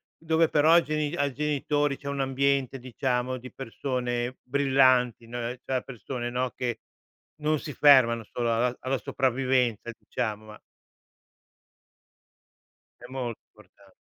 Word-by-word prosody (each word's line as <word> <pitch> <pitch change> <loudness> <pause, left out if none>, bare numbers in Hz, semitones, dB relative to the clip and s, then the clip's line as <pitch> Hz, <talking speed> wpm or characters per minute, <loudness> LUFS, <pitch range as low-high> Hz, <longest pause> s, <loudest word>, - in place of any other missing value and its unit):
dove 160 0 +2
però 155 +2 +4
ai 170 - +6
geni 155 +1 -2
ai 140 -4 0
genitori, 145 0 0
c'è 140 - -10
un 140 0 -3
ambiente 135 0 +1
diciamo 125 0 -2
di 130 +1 -10
persone 125 -1 -3
brillanti, 130 -3 +3
no, 120 +1 -6 0.3
cioè 130 -1 -1
persone 120 0 -5
no, 125 +1 -1
che 120 -2 -3 0.6
non 155 +1 +2
si 145 - -7
fermano 120 -6 +5
solo 120 -1 0
alla 120 +2 0
alla 130 -1 -1
sopravvivenza 125 -2 0
diciamo 110 -3 -4
ma 105 0 -12 2.4
È - - -10
molto 125 -3 -4
importan 100 -2 -22
130 Hz, 130 wpm, -27 LUFS, 120-140 Hz, 2.4 s, ai